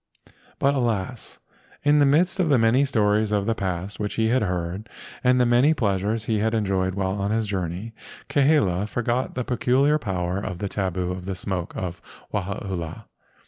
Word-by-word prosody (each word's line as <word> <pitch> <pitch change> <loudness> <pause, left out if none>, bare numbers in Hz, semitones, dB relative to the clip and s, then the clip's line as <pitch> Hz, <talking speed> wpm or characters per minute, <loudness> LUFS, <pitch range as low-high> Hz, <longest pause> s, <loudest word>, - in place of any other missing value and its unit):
But 140 +1 +2
alas! 120 -3 -2 0.5
in 145 +1 +4
the 145 - +5
midst 175 +7 +3
of 175 -4 +2
the 140 - +5
many 115 +4 +4
stories 105 -4 +2
of 100 -1 +1
the 115 - +1
past 95 -1 -4
which 105 -1 -3
he 110 0 +1
had 130 +2 +2
heard, 90 +2 -3 0.3
and 125 0 +4
the 125 - +4
many 125 +6 +4
pleasures 105 -1 0
he 110 -1 0
had 110 +2 +1
enjoyed 95 -3 0
while 95 -1 -1
on 100 +1 -2
his 110 +1 +1
journey, 95 +2 -3 0.3
Kahele 135 - +2
forgot 120 +2 -1
the 125 - -1
peculiar 130 +4 +2
power 90 -5 -2
of 95 -3 -4
the 100 - -3
tabu 95 -2 -2
of 90 0 -6
the 95 0 -3
smoke 90 -2 -3
of 90 -1 -4 0.3
Wahaula. 95 -4 -4
105 Hz, 180 wpm, -24 LUFS, 95-125 Hz, 0.5 s, the